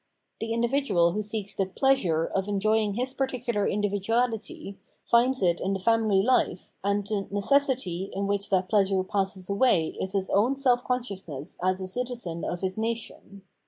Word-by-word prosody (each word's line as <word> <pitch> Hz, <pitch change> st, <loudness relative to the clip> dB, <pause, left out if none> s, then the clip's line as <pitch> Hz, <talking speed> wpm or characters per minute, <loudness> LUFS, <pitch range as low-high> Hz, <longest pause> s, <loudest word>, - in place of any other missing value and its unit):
The 225 Hz, 0 st, -4 dB
individual 230 Hz, -7 st, +2 dB
who 210 Hz, -, -2 dB
seeks 210 Hz, -1 st, -3 dB
the 195 Hz, -1 st, -1 dB
pleasure 190 Hz, -, +2 dB
'' -, -, -8 dB
of 195 Hz, 0 st, 0 dB
enjoying 210 Hz, +1 st, +1 dB
his 255 Hz, +3 st, -2 dB
particular 250 Hz, -6 st, -1 dB
individuality, 205 Hz, +1 st, -1 dB, 0.3 s
finds 245 Hz, 0 st, +3 dB
it 175 Hz, -1 st, +2 dB
in 195 Hz, -, 0 dB
the 195 Hz, -, -2 dB
family 215 Hz, -2 st, +3 dB
life, 240 Hz, -6 st, +1 dB
and 200 Hz, 0 st, 0 dB
the 205 Hz, -1 st, -2 dB
necessity 205 Hz, -4 st, +1 dB
in 200 Hz, +1 st, -2 dB
which 200 Hz, 0 st, -1 dB
that 190 Hz, -1 st, +1 dB
pleasure 195 Hz, -2 st, +2 dB
passes 190 Hz, -1 st, -2 dB
away 200 Hz, -6 st, +2 dB
is 190 Hz, +1 st, -3 dB
his 195 Hz, -1 st, -1 dB
own 230 Hz, +7 st, +3 dB
self 250 Hz, -3 st, +2 dB
consciousness 190 Hz, -, -3 dB
as 185 Hz, +1 st, +1 dB
a 190 Hz, -, -4 dB
citizen 230 Hz, -5 st, -3 dB
of 175 Hz, -, -3 dB
his 190 Hz, +2 st, -1 dB
nation. 220 Hz, -3 st, -4 dB
205 Hz, 165 wpm, -27 LUFS, 190-235 Hz, 0.3 s, finds